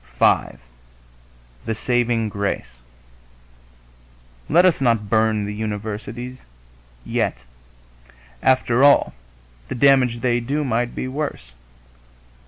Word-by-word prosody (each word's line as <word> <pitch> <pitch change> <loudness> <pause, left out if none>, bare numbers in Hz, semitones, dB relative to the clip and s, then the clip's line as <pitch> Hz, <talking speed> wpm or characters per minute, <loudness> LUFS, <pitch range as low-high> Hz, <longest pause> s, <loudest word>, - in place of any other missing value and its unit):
V - - +2 1.1
THE 115 0 -2
SAVING 120 -1 0
GRACE 100 -12 -4 1.7
Let 175 +4 +5
us 180 -6 +3
not 115 -5 +1
burn 110 -1 +2
the 105 - -5
universities 110 +4 -6 0.6
yet. 65 - -2 1.0
After 130 -1 +2
all, 145 0 +5 0.5
the - - -5
damage 125 -2 +3
they 120 -1 +1
do 140 +6 -2
might 120 -2 -1
be - - -3
worse.... 130 - -5
120 Hz, 95 wpm, -21 LUFS, 105-130 Hz, 1.7 s, Let